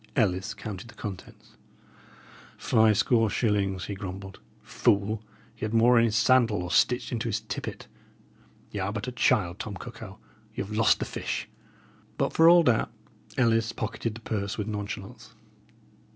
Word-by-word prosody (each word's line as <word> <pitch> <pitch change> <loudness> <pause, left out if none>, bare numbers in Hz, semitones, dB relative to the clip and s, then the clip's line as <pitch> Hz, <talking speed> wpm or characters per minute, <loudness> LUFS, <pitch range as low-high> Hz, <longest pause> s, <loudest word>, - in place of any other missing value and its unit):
Ellis 95 -7 +1
counted 105 0 -7
the - - -14
contents. 95 -4 -9 1.1
"Five 110 -2 +3
score 115 -1 +3
shillings!" 100 -5 0
he 100 - -4
grumbled. 95 0 -7 0.2
"Fool, 105 +2 +1 0.3
he 115 - -12
had 110 +1 -1
more 120 +1 +6
in 115 - +4
his 110 -2 0
sandal, 115 -4 +3
or 90 - -5
stitched 125 +5 +2
into 115 -3 -2
his - - -1
tippet. - - -6 0.9
Y' 105 - -4
are 95 +1 -1
but 105 +2 -4
a - - -2
child, 90 -6 +1
Tom 105 -2 -5
Cuckow; - - -9 0.4
ye - - -2
have 105 +2 -7
lost 110 -1 +4
the - - -3
fish." - - -4 0.7
But, - - 0
for 165 +1 +7
all 175 0 +7
that, 120 -7 +2 0.5
Ellis 115 -3 +2
pocketed 110 0 -3
the 115 - -10
purse 100 -3 -3
with 105 - -2
nonchalance. 100 -2 -6
110 Hz, 160 wpm, -27 LUFS, 100-115 Hz, 1.1 s, for